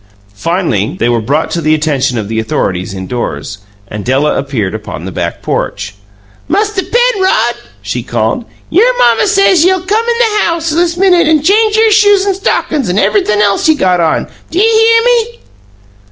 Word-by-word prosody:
Finally, 120 - -2
they 120 - +1
were 120 -1 0
brought 145 +8 -1
to 170 - -2
the 155 0 +2
attention 140 -5 -1
of 105 -3 -3
the 110 +1 -2
authorities 95 -4 -3
indoors, 95 -3 -5 0.3
and 105 0 -7
Della 135 +6 0
appeared 120 -9 -3
upon 105 -6 -7
the 95 - -6
back 85 -1 -4
porch. 100 -1 -3 0.6
"Musther 410 +3 0
Penrod," 475 -4 +1 0.3
she - - -3
called, - - -2 0.3
"y'r 470 +8 +3
mamma 235 - +3
says 385 -4 +3
ye'll 370 0 +1
c'm 415 +4 +1
in 470 - 0
the 440 -3 +1
house 335 -1 -1
this 340 +2 0
minute 360 -3 +3
an' 310 -2 +2
change 425 +5 +2
y'r 445 0 +3
shoes 410 -2 +4
an' 400 - +1
stockin's 315 - -1
an' 180 - -1
everythun' 210 - +1
else 205 +8 +1
ye 315 - +4
got 185 -9 +1
on! 165 -2 0 0.2
D'ye 360 +5 +1
hear 455 +1 +4
me?" 475 -1 0
305 Hz, 175 wpm, -11 LUFS, -, 0.6 s, shoes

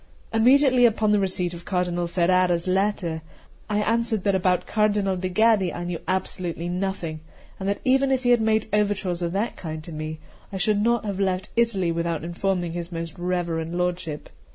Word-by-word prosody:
Immediately 250 +2 +5
upon 215 -1 +1
the 210 - +4
receipt 185 -2 0
of 170 0 -9
Cardinal 175 -1 -1
Ferrara's 175 0 +2
letter, 185 -4 0 0.5
I 210 0 +1
answered 225 -2 0
that 200 - +2
about 180 -1 +1
Cardinal 205 -3 +1
de' 185 0 -3
Gaddi 210 -2 +3
I 175 - -5
knew 175 -1 -4
absolutely 175 -2 -2
nothing, 180 -3 -3 0.4
and 190 0 -2
that 200 - -2
even 270 +1 +3
if 260 -1 +1
he 245 - +3
had 240 -2 +4
made 220 0 +1
overtures 200 -4 0
of 170 -1 -1
that 210 +5 -2
kind 155 -2 -6
to 170 - -8
me, 155 0 -5 0.3
I 195 - -4
should 205 +2 +1
not 235 0 +1
have 200 -2 -3
left 190 -1 0
Italy 210 -7 +2
without 170 -1 -2
informing 175 0 -1
his 170 +1 -5
most 165 -2 -5
reverend 175 -2 -2
lordship. 180 -4 -3
185 Hz, 180 wpm, -24 LUFS, 175-210 Hz, 0.5 s, Immediately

